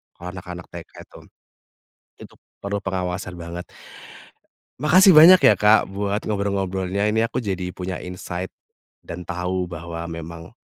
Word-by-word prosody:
kalau 85 Hz, -, -10 dB
anak-anak 90 Hz, -1 st, -8 dB
TK -, -, -10 dB
itu. -, -, -16 dB, 1.0 s
Itu -, -, -13 dB, 0.3 s
perlu 100 Hz, 0 st, -3 dB
pengawasan 90 Hz, -1 st, -3 dB
banget. 85 Hz, +1 st, -7 dB, 1.1 s
Makasih 185 Hz, +7 st, +6 dB
banyak 170 Hz, +3 st, +8 dB
ya 105 Hz, -2 st, +6 dB
Kak, 105 Hz, -2 st, +4 dB
buat 100 Hz, +2 st, -2 dB
ngobrol-ngobrolnya. 100 Hz, -2 st, -2 dB
Ini 110 Hz, +1 st, +1 dB
aku 125 Hz, +1 st, -4 dB
jadi 95 Hz, -3 st, -3 dB
punya 90 Hz, 0 st, -5 dB
insight, 90 Hz, 0 st, -6 dB, 0.6 s
dan 85 Hz, +1 st, -8 dB
tahu 90 Hz, 0 st, -2 dB
bahwa 85 Hz, 0 st, -7 dB
memang 85 Hz, 0 st, -9 dB
95 Hz, 130 wpm, -22 LUFS, 90-100 Hz, 1.1 s, banyak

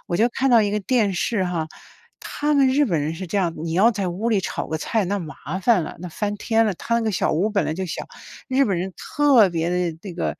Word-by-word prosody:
我 175 Hz, -, 0 dB
就 230 Hz, +4 st, +3 dB
看 270 Hz, +2 st, 0 dB
到 235 Hz, -2 st, +6 dB
一 205 Hz, -, 0 dB
个 210 Hz, -, 0 dB
电 215 Hz, -2 st, +1 dB
视 190 Hz, +2 st, 0 dB
哈。 170 Hz, -3 st, -2 dB, 0.5 s
他 295 Hz, 0 st, -1 dB
们 275 Hz, -2 st, +5 dB
日 285 Hz, +3 st, +3 dB
本 170 Hz, -7 st, 0 dB
人 155 Hz, +3 st, -2 dB
是 185 Hz, +3 st, -6 dB
这 200 Hz, -, -3 dB
样， 170 Hz, -3 st, 0 dB
你 165 Hz, -1 st, -3 dB
要 215 Hz, +6 st, +5 dB
在 200 Hz, -3 st, -2 dB
屋 195 Hz, +7 st, -2 dB
里 205 Hz, -3 st, +2 dB
炒 -, -, -4 dB
个 160 Hz, -, -3 dB
菜 215 Hz, +4 st, 0 dB
那 200 Hz, +3 st, -1 dB
麻 155 Hz, -3 st, -8 dB, 0.3 s
烦 220 Hz, -5 st, +4 dB
了， -, -, -8 dB
那 180 Hz, -, -6 dB
翻 205 Hz, +4 st, -3 dB
天 225 Hz, +1 st, +1 dB
了， 200 Hz, -, 0 dB
他 230 Hz, -, -3 dB
那 235 Hz, -, 0 dB
个 220 Hz, -2 st, -1 dB
小 -, -, 0 dB
屋 175 Hz, +7 st, +1 dB
儿 -, -, -6 dB
本 205 Hz, -1 st, +1 dB
来 155 Hz, -, -2 dB
就 190 Hz, +2 st, -3 dB
小， -, -, -5 dB, 0.4 s
日 265 Hz, +1 st, +3 dB
本 195 Hz, -6 st, 0 dB
人 185 Hz, +1 st, -4 dB
特 270 Hz, -9 st, +4 dB
别 165 Hz, 0 st, -1 dB
地 175 Hz, -3 st, -1 dB
那 195 Hz, -4 st, -7 dB
个， 175 Hz, -, -2 dB
200 Hz, 295 characters per minute, -22 LUFS, 175-230 Hz, 0.5 s, 到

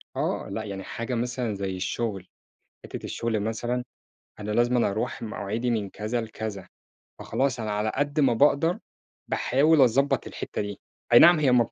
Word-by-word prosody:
آه -, -, -2 dB
لأ -, -, -3 dB
يعني 100 Hz, -2 st, -6 dB
حاجة 115 Hz, +5 st, -4 dB
مثلًا 120 Hz, -1 st, -2 dB
زي 95 Hz, -1 st, -3 dB
الشغل، 95 Hz, 0 st, -3 dB, 0.6 s
حِتّة -, -, -7 dB
الشغل 115 Hz, -2 st, -2 dB
مثلًا 120 Hz, +4 st, -2 dB, 0.6 s
أنا 105 Hz, 0 st, -4 dB
لازمًا 120 Hz, +1 st, +3 dB
أروْح 105 Hz, +3 st, -3 dB
مواعيدي 110 Hz, +2 st, -3 dB
من 105 Hz, -4 st, -1 dB
كذا 110 Hz, +5 st, -3 dB
لكذا، 110 Hz, -3 st, -6 dB, 0.5 s
فخلاص 135 Hz, -2 st, -1 dB
أنا 110 Hz, -2 st, -2 dB
على 105 Hz, +1 st, 0 dB
قد 145 Hz, +2 st, 0 dB
ما 135 Hz, -4 st, +4 dB
باقدر 145 Hz, +7 st, +3 dB, 0.5 s
باحاول 145 Hz, +4 st, +3 dB
أضبّط 135 Hz, +2 st, +3 dB
الحِتّة -, -, -5 dB
دي، 100 Hz, -1 st, -5 dB, 0.3 s
أي 120 Hz, -, +10 dB
نعم 170 Hz, -1 st, +8 dB
هي 140 Hz, -4 st, +3 dB
ما 125 Hz, -1 st, +5 dB
بت -, -, -9 dB
115 Hz, 165 wpm, -26 LUFS, 105-130 Hz, 0.6 s, أي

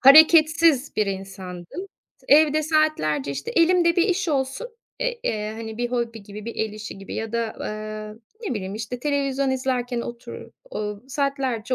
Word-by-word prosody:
Hareketsiz 310 Hz, 0 st, +7 dB
bir 215 Hz, -, +2 dB
insandım. 190 Hz, -, -6 dB, 0.3 s
T -, -, -25 dB
evde 310 Hz, 0 st, +4 dB
saatlerce, 300 Hz, -, +1 dB
işte, 140 Hz, 0 st, -4 dB
elimde 340 Hz, 0 st, +4 dB
bir 345 Hz, -, +5 dB
iş 370 Hz, 0 st, +1 dB
olsun 270 Hz, -, -1 dB, 0.3 s
e -, -, +1 dB
eee, 215 Hz, -, -3 dB
hani, 220 Hz, 0 st, -6 dB
bir 240 Hz, 0 st, -1 dB
hobi 235 Hz, -3 st, -2 dB
gibi, 205 Hz, +1 st, -9 dB
bir 230 Hz, -, -5 dB
el 220 Hz, -1 st, -1 dB
işi 215 Hz, -2 st, -7 dB
gibi 195 Hz, -, -8 dB
ya 225 Hz, 0 st, -4 dB
da, 230 Hz, -1 st, -1 dB
ııı, 215 Hz, +1 st, -5 dB, 0.2 s
ne 405 Hz, -, -2 dB
bileyim, 195 Hz, -1 st, -4 dB
işte, 225 Hz, +3 st, -5 dB
televizyon 275 Hz, -1 st, 0 dB
izlerken 255 Hz, -2 st, -1 dB
oturu 235 Hz, 0 st, -8 dB, 0.2 s
ooo, 210 Hz, -, -4 dB
saatlerce 265 Hz, -4 st, -1 dB
245 Hz, 165 wpm, -24 LUFS, 215-305 Hz, 0.3 s, Hareketsiz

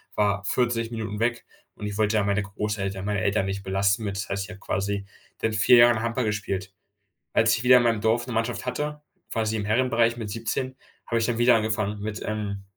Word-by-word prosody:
war 100 Hz, -1 st, +1 dB
40 115 Hz, 0 st, 0 dB
Minuten 110 Hz, -3 st, -4 dB
weg 120 Hz, +1 st, 0 dB, 0.3 s
und -, -, -7 dB
ich 105 Hz, -1 st, -5 dB
wollte 110 Hz, 0 st, +2 dB
da 105 Hz, -, +2 dB
meine 100 Hz, +1 st, +1 dB
Großeltern 100 Hz, -1 st, -3 dB
meine 105 Hz, -1 st, -1 dB
Eltern 100 Hz, -1 st, +1 dB
nicht 100 Hz, 0 st, -4 dB
belasten 100 Hz, +2 st, +1 dB
mit. 100 Hz, -2 st, -3 dB
Das 100 Hz, -, -4 dB
heißt, 100 Hz, 0 st, -1 dB
ich -, -, -13 dB
habe 100 Hz, -2 st, -10 dB
quasi 100 Hz, +1 st, -2 dB, 0.4 s
seit 110 Hz, -1 st, 0 dB
4 115 Hz, +3 st, +6 dB
Jahren 120 Hz, -1 st, +6 dB
Handball 115 Hz, +1 st, -1 dB
gespielt. 100 Hz, -2 st, -3 dB, 0.6 s
Als 115 Hz, 0 st, +4 dB
ich 115 Hz, -, -5 dB
wieder 125 Hz, 0 st, +8 dB
in 125 Hz, -, +3 dB
meinem 115 Hz, -2 st, +1 dB
Dorf 115 Hz, +3 st, +1 dB
'ne 125 Hz, -, -4 dB
Mannschaft 115 Hz, +2 st, -1 dB
hatte, 150 Hz, +4 st, -3 dB, 0.3 s
quasi 110 Hz, -1 st, 0 dB
im 105 Hz, -, -3 dB
Herrenbereich 115 Hz, +1 st, +2 dB
mit 110 Hz, -3 st, -5 dB
17, 115 Hz, +4 st, -3 dB, 0.3 s
habe 115 Hz, -, 0 dB
ich 115 Hz, -, +1 dB
dann 120 Hz, -1 st, -1 dB
wieder 120 Hz, 0 st, +6 dB
angefangen 110 Hz, -2 st, -1 dB
mit 105 Hz, 0 st, -4 dB
ähm, 105 Hz, -2 st, -3 dB
110 Hz, 215 wpm, -25 LUFS, 100-115 Hz, 0.6 s, wieder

